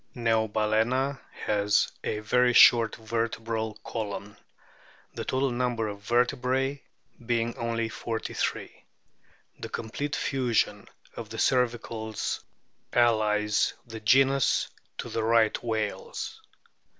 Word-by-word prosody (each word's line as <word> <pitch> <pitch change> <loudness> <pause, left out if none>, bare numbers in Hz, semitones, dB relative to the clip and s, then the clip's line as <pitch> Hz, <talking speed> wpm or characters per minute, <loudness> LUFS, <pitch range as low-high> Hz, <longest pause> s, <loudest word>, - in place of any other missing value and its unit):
* - - -33
Neobalana 115 +3 +1 0.3
has 105 0 +2
a - - -1
very 125 +3 +3
short 115 -1 +7
vertebral 115 -1 -2
column, 105 -2 -5 0.8
the - - -4
total 130 0 0
number 120 -2 -1
of 100 -1 -6
vertebrae 125 +4 +1 0.4
being 115 0 0
only 115 -1 -1
forty 110 0 -4
three. - - -3 0.8
The - - -6
complete 140 +6 -3
fusion 125 -5 0 0.3
of 115 -2 -7
the 115 - -7
cervicals 115 -4 0 0.5
allies 105 -3 +2
the 115 -2 -8
genus 135 +4 +3 0.3
to - - -5
the 115 - -2
Right 110 -1 +3
whales. 110 -3 -3
115 Hz, 105 wpm, -27 LUFS, 110-125 Hz, 0.8 s, short